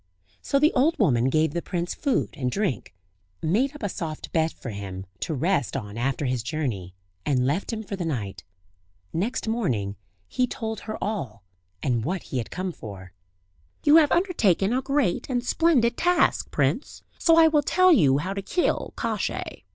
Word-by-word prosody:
So 275 Hz, -, +1 dB
the 300 Hz, +3 st, +4 dB
old 300 Hz, +6 st, +3 dB
woman 125 Hz, -, +3 dB
gave 155 Hz, +1 st, +2 dB
the 170 Hz, -, -1 dB
prince 175 Hz, 0 st, -3 dB
food 280 Hz, -4 st, 0 dB
and 125 Hz, -2 st, -2 dB
drink, 130 Hz, -, -2 dB, 0.4 s
made 240 Hz, -, +1 dB
up 295 Hz, -, -10 dB
a -, -, +1 dB
soft 160 Hz, -4 st, -5 dB
bed 160 Hz, -1 st, +2 dB
for 115 Hz, -, -8 dB
him, 95 Hz, -2 st, -6 dB
to 155 Hz, -, -2 dB
rest 165 Hz, 0 st, 0 dB
on 105 Hz, -5 st, -6 dB
after 135 Hz, +4 st, -1 dB
his 125 Hz, -2 st, 0 dB
journey, 115 Hz, -, -3 dB, 0.3 s
and 130 Hz, -1 st, +1 dB
left 150 Hz, -, -1 dB
him 220 Hz, -1 st, -4 dB
for 200 Hz, -, -5 dB
the 185 Hz, -, -4 dB
night. 105 Hz, -11 st, -4 dB, 0.7 s
Next 215 Hz, +8 st, -1 dB
morning 125 Hz, -, -1 dB, 0.3 s
he 250 Hz, -, 0 dB
told 220 Hz, -2 st, -4 dB
her 215 Hz, 0 st, -6 dB
all, 125 Hz, -, -4 dB, 0.4 s
and 120 Hz, -6 st, +1 dB
what 180 Hz, +5 st, -2 dB
he 130 Hz, -, -3 dB
had 115 Hz, -, -5 dB
come 185 Hz, 0 st, -3 dB
for. 95 Hz, -, -10 dB, 0.7 s
"You 300 Hz, +2 st, +7 dB
have 305 Hz, -3 st, +5 dB
undertaken 230 Hz, -, +2 dB
a 260 Hz, -, +1 dB
great 275 Hz, -8 st, 0 dB
and 245 Hz, -2 st, -1 dB
splendid 255 Hz, -7 st, +3 dB
task, 355 Hz, +1 st, +2 dB
prince; -, -, -1 dB, 0.2 s
so 330 Hz, -1 st, +5 dB
I 325 Hz, -1 st, +8 dB
will 305 Hz, -2 st, +3 dB
tell 370 Hz, +5 st, +4 dB
you 140 Hz, -, +5 dB
how 185 Hz, +7 st, -2 dB
to 200 Hz, -, -3 dB
kill 350 Hz, -, -1 dB
Kosciey. -, -, -3 dB
175 Hz, 180 wpm, -25 LUFS, -, 0.7 s, I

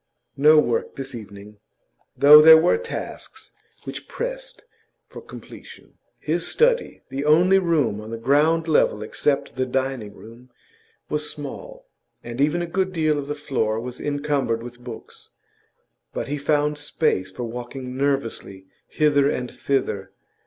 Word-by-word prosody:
No 150 Hz, +3 st, +6 dB
work 120 Hz, -6 st, +1 dB
this 135 Hz, 0 st, -7 dB
evening, 105 Hz, -2 st, -11 dB, 0.6 s
though 150 Hz, +2 st, +9 dB
there 160 Hz, +1 st, +10 dB
were 175 Hz, -, +3 dB
tasks 470 Hz, -1 st, -7 dB, 0.3 s
which -, -, -8 dB
pressed -, -, -6 dB, 0.4 s
for -, -, -11 dB
completion. -, -, -13 dB, 0.2 s
His -, -, -2 dB
study 480 Hz, 0 st, +1 dB
the 135 Hz, +2 st, -4 dB
only 175 Hz, +6 st, +5 dB
room 145 Hz, -, 0 dB
on 110 Hz, -, -9 dB
the 115 Hz, -, -5 dB
ground 150 Hz, +7 st, +2 dB
level 110 Hz, -8 st, +2 dB
except 140 Hz, +6 st, -1 dB
the 130 Hz, +1 st, -2 dB
dining 130 Hz, -5 st, -3 dB
room 115 Hz, +4 st, -14 dB, 0.6 s
was 150 Hz, 0 st, -2 dB
small, -, -, -8 dB, 0.4 s
and 120 Hz, +3 st, -5 dB
even 155 Hz, +4 st, +1 dB
a -, -, -2 dB
good 185 Hz, +2 st, -1 dB
deal 155 Hz, -3 st, +1 dB
of 140 Hz, -, -6 dB
the 145 Hz, -, -3 dB
floor 120 Hz, -7 st, -1 dB
was 125 Hz, +1 st, -7 dB
encumbered 145 Hz, -5 st, -1 dB
with 120 Hz, 0 st, -10 dB
books, 120 Hz, -2 st, -10 dB, 0.9 s
but -, -, -3 dB
he 145 Hz, +1 st, -3 dB
found 150 Hz, +1 st, 0 dB
space 95 Hz, -, -1 dB
for 95 Hz, +6 st, -7 dB
walking 125 Hz, +2 st, -7 dB
nervously 130 Hz, -8 st, -2 dB, 0.2 s
hither 145 Hz, -2 st, +2 dB
and 125 Hz, -3 st, -3 dB
thither. 130 Hz, -8 st, -2 dB
140 Hz, 145 wpm, -23 LUFS, 120-155 Hz, 0.9 s, there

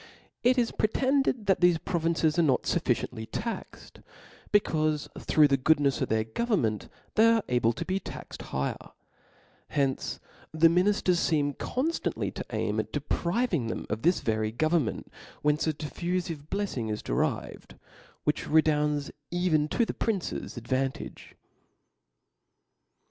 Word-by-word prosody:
It 250 Hz, +2 st, +4 dB
is 240 Hz, -2 st, +2 dB
pretended 260 Hz, +1 st, +1 dB
that 190 Hz, -2 st, +3 dB
thcfe 175 Hz, -2 st, +3 dB
provinces 165 Hz, -1 st, +1 dB
are -, -, +6 dB
not 135 Hz, -6 st, +2 dB
fufficiently 110 Hz, 0 st, -1 dB
taxed, 230 Hz, +1 st, -6 dB, 0.5 s
becaufe 155 Hz, -7 st, +2 dB
through 150 Hz, -1 st, +5 dB
the 135 Hz, -1 st, +2 dB
goodnefs 145 Hz, 0 st, +3 dB
of -, -, 0 dB
their 110 Hz, 0 st, +2 dB
government 115 Hz, -, -1 dB, 0.2 s
they 225 Hz, +1 st, +6 dB
arc 225 Hz, -2 st, +1 dB
able 120 Hz, -2 st, +2 dB
to -, -, -5 dB
be 190 Hz, +1 st, -1 dB
taxed -, -, -9 dB
higher: 70 Hz, 0 st, -3 dB, 0.7 s
hence 135 Hz, -3 st, -1 dB, 0.3 s
the 160 Hz, +1 st, +5 dB
minifters 180 Hz, 0 st, +2 dB
feem 145 Hz, -3 st, +1 dB
con 265 Hz, +6 st, -1 dB
ftantly -, -, -3 dB
to -, -, -5 dB
aim -, -, -1 dB
at -, -, -3 dB
depriving 175 Hz, -, 0 dB
them -, -, -4 dB
of 105 Hz, +1 st, -2 dB
this 175 Hz, +3 st, +3 dB
very 110 Hz, -1 st, 0 dB
go 155 Hz, +8 st, 0 dB
vernment, 160 Hz, -9 st, 0 dB
from -, -, -26 dB, 0.3 s
whence 150 Hz, +2 st, +2 dB
a 160 Hz, -, +2 dB
diflfufive 165 Hz, 0 st, -3 dB
blefling 155 Hz, -, -2 dB
is 105 Hz, -, -4 dB
de -, -, -3 dB
rived, -, -, -2 dB, 0.5 s
which 150 Hz, 0 st, -1 dB
redounds 150 Hz, -2 st, +2 dB, 0.2 s
even 175 Hz, -4 st, +1 dB
to 235 Hz, +9 st, +1 dB
the -, -, -3 dB
prince's 200 Hz, -, -3 dB
ad* 120 Hz, 0 st, -8 dB
vantage. 130 Hz, 0 st, -3 dB
155 Hz, 145 wpm, -28 LUFS, 135-185 Hz, 0.7 s, are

